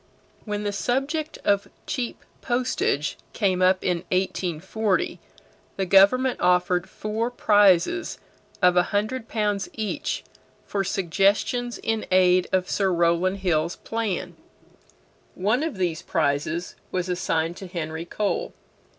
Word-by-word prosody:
When 210 -1 -3
the 205 - -1
subject 275 +9 -1
of 200 0 +2 0.2
cheap 245 -3 -4 0.2
postage 240 - 0
came 190 -4 +1
up 185 0 +4
in 180 -2 +1
1840, 185 +2 -1 0.6
the 195 - -1
government 200 +8 +5
offered 180 0 +2
four 220 +2 -2
prizes 205 - +3 0.5
of 180 0 +6
a 180 - +6
hundred 220 +4 -1
pounds 210 -4 -1
each 215 -2 -3 0.4
for 200 -1 -1
suggestions 200 +6 +1
in 225 -1 -2
aid 185 -1 +4
of 185 -1 +1
Sir 195 -2 +1
Rowland 175 +3 +2
Hill's 170 -2 +1
plan. 225 -5 -3 1.0
One 215 +8 +1
of 310 -9 -3
these 175 -4 -1
prizes 155 +3 -1 0.2
was 185 -1 -1
assigned 170 -2 -1
to 190 - -8
Henry 160 -2 -4
Cole. 215 - -2
195 Hz, 120 wpm, -25 LUFS, 180-220 Hz, 1.0 s, of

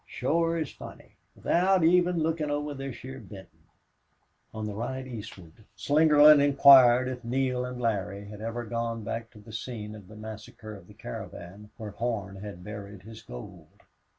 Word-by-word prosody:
"Shore 165 +5 0
is 155 -3 -3
funny. - - -12 0.2
Without 185 0 +2
even 175 0 +4
lookin' 160 -2 -1
over 145 0 -2
this 135 -2 -6
heah 130 +1 -9
Benton." 95 -3 -13 0.9
On 110 0 -5
the 105 - -4
ride 130 +5 -4
eastward 100 -8 -9 0.3
Slingerland 150 0 +6
inquired 135 -3 +7
if 125 -1 -5
Neale 125 +1 0
and 125 0 -6
Larry 100 -3 -2
had 105 +1 -10
ever 115 +2 -4
gone 115 0 -3
back 115 +2 -4
to 115 - -18
the 105 +1 -13
scene 110 -2 -6
of 105 -3 -12
the 110 - -13
massacre 110 0 -9
of 95 -4 -13
the - - -16
caravan 90 +11 -9
where 110 -3 -7
Horn 100 -3 -3
had 100 -3 -8
buried 100 -1 -9
his 110 +1 -11
gold. - - -10
115 Hz, 165 wpm, -28 LUFS, 105-140 Hz, 0.9 s, inquired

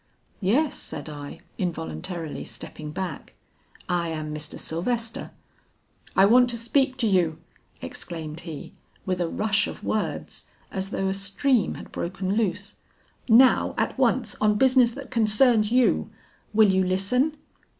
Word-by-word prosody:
'Yes,' 250 +10 +2
said - - -5
I, 145 -1 -8 0.2
involuntarily 170 -1 -4
stepping 155 -1 -7
back, 185 +4 -6 0.5
'I 175 -2 0
am 155 -1 -4
Mr. 150 -1 -4
Sylvester.' 225 +7 -2 0.9
'I 190 - +7
want 245 +4 +6
to 235 - -1
speak 260 +3 +1
to 240 -3 +1
you,' 175 -6 +2 0.5
exclaimed 160 -2 -5
he, 160 -4 -8 0.3
with 185 -1 -1
a 170 - 0
rush 205 +1 +1
of - - -8
words 215 - -3 0.2
as 190 -1 -3
though 195 -1 -1
a 190 - +1
stream 200 +5 +1
had - - -10
broken 190 +2 -3
loose; 210 -4 -1 0.5
'now, 250 +3 +5
at - - 0
once, - - +1
on 210 -1 +4
business 255 +1 +5
that 275 -1 -9
concerns 220 -1 +3
you. 250 0 +3 0.4
Will 215 -1 +5
you 190 0 +3
listen?' 225 +12 +1
195 Hz, 140 wpm, -25 LUFS, 175-235 Hz, 0.9 s, I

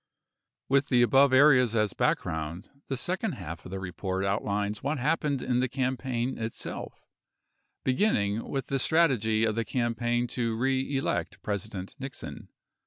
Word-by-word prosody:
With 140 +1 +2
the 120 -2 +5
above 135 +3 +5
areas 130 -4 +6
as 105 -4 +2
background, 80 +3 -1 0.2
the 135 - -2
second 185 - -1
half 85 - -7
of - - -8
the 95 +1 -4
report 95 +1 -3
outlines 100 +1 -1
what 145 +3 -1
happened 145 0 0
in 125 -1 +1
the 130 0 +1
campaign 130 -1 -2
itself, 115 0 -6 0.8
beginning 115 - +1
with 135 -3 -2
the 135 - -1
strategy 125 -9 +3
of 110 -1 +2
the 115 +1 0
campaign 120 0 0
to 115 -3 -1
reelect 135 +2 -1
President 100 -2 -4
Nixon. 135 0 -7
120 Hz, 140 wpm, -28 LUFS, 105-135 Hz, 0.8 s, areas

